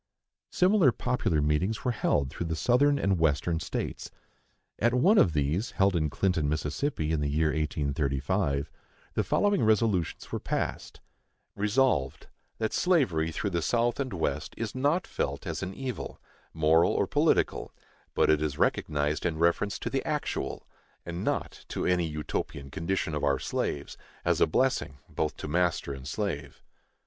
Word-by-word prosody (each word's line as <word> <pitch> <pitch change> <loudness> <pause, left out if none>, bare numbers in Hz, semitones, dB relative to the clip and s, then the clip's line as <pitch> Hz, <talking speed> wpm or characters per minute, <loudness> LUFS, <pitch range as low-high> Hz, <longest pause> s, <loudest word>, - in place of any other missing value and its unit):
Similar 185 -6 +4
popular 110 -12 0
meetings 90 - 0
were 125 - +2
held 70 - 0
through 85 - -4
the 80 - -1
Southern 130 - +3
and 95 -8 +1
Western 80 +1 +1
States. - - -4 0.7
At 120 +2 +2
one 195 - +5
of 85 - +4
these, 75 - 0
held 95 -1 +3
in 75 -2 +1
Clinton, 80 -2 0
Mississippi, 80 - -1
in 80 -2 0
the 70 - 0
year 75 +2 +2
1835, 70 +1 -1 0.4
the - - +1
following 205 -2 +2
resolutions 110 -5 +1
were - - -2
passed: - - -3 0.5
Resolved, 105 - +1 0.3
That 110 -1 -1
slavery 120 - +2
through 100 +5 -2
the 85 -1 0
South 120 - +1
and 135 -2 -2
West 75 -4 -2
is 115 -2 -3
not 145 +7 +1
felt - - -3
as - - -3
an 95 0 -4
evil, 130 -4 -5 0.3
moral 80 +2 +3
or - - +2
political, - - +1 0.4
but - - +4
it 75 -1 +3
is 75 -2 -2
recognized 75 0 0
in 85 -3 -1
reference 85 +5 +1
to - - -4
the - - 0
actual, - - -3 0.4
and 85 +1 -4
not - - -2
to - - -3
any 90 -2 +2
Utopian 75 -2 -4
condition 85 0 -2
of 75 - -2
our 70 -1 +3
slaves, 70 +2 -3 0.3
as - - +2
a - - +6
blessing 70 - 0
both 75 - -2
to - - -6
master 85 -3 0
and 65 -1 -8
slave. 70 -4 -4
85 Hz, 155 wpm, -28 LUFS, 75-110 Hz, 0.7 s, a